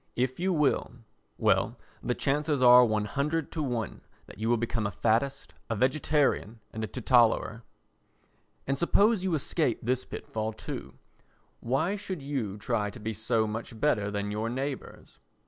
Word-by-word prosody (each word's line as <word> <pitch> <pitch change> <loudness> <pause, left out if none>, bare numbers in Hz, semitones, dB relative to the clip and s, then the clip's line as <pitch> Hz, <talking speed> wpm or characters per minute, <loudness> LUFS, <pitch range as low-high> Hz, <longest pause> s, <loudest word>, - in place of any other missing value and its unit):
If 130 +3 -1
you 190 +2 +1
will—well, 120 -8 0 0.2
the - - -1
chances 145 +1 0
are 125 0 +8
100 135 +8 0
to 160 - -3
1 120 -7 -3 0.2
that - - -13
you 110 +1 -1
will 120 - +4
become 115 -2 -1
a - - -4
faddist, 120 +8 0 0.2
a 115 - 0
vegetarian 130 -2 +1
and 110 - -4
a - - -1
teetotaller. 115 0 +2 1.0
And 135 0 -1
suppose 200 +3 +3
you 185 -3 +1
escape 145 -3 0
this 125 +2 0
pit - - -8
fall 110 0 -3
too. 110 - -7 0.6
Why 140 +11 0
should 185 -7 -6
you 125 -8 -3
try 105 0 -1
to 120 - -10
be 110 +1 -3
so 110 +1 +1
much 110 +1 -5
better 110 -8 +2
than 100 0 -3
your 110 +2 -2
neighbours? 135 +2 -5
120 Hz, 155 wpm, -29 LUFS, 110-145 Hz, 1.0 s, are